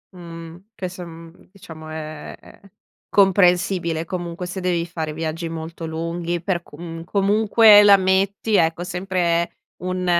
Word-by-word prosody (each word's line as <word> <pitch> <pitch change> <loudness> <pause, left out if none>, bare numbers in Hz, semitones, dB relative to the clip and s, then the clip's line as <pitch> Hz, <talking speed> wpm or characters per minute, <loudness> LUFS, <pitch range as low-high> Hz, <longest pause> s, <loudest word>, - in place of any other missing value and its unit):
Mhmm, 170 0 -10
che 185 - -4
so 180 0 -9
mhmm, 165 0 -14
diciamo 160 -5 -12
è 155 -1 -7
è - - -18 0.5
comprensibile, 180 -4 +2
comunque, 175 0 -5
se 180 +2 -5
devi 175 -2 -1
fare 160 -3 -4
viaggi 165 +2 -4
molto 165 0 -7
lunghi 170 +1 -3
per 175 0 -1
comun 165 +1 -9
comunque 205 +3 +5
la 200 -1 +8
metti, 195 +3 +1
ecco, 165 -1 +2
sempre 180 -2 -1 0.3
un 185 0 -2
175 Hz, 135 wpm, -21 LUFS, 165-190 Hz, 0.5 s, la